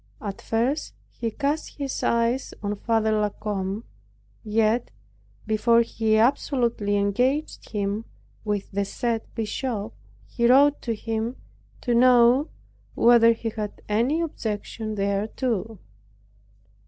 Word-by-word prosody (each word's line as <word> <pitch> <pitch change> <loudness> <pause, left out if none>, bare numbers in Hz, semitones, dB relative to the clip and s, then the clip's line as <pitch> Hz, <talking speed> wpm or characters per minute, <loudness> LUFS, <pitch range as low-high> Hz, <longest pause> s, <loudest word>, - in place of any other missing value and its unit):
At 200 -2 -6
first 245 +7 -1 0.2
he 230 - -3
cast 290 +6 -2
his 275 -2 -3
eyes 235 +3 0
on 205 0 -1
Father 220 +1 +1
La 210 -1 +2
Combe; 200 0 -4 0.6
yet 220 +2 +1 0.6
before 230 +2 +3
he 220 -1 +1
absolutely 235 -3 +1
engaged 250 +9 0
him 205 +1 -2 0.4
with 210 -2 -2
the 200 0 0
said 230 +3 -2
bishop, 225 -1 -3 0.3
he 235 -1 0
wrote 285 +3 +5
to 230 -2 -2
him, 225 +3 -3 0.5
to 245 - 0
know 245 +3 +5 0.5
whether 235 -1 +6
he 225 0 -4
had 215 -1 -6
any 240 +10 +1
objection 220 -6 -4
thereto. 210 +2 -1
225 Hz, 115 wpm, -25 LUFS, 210-245 Hz, 0.6 s, whether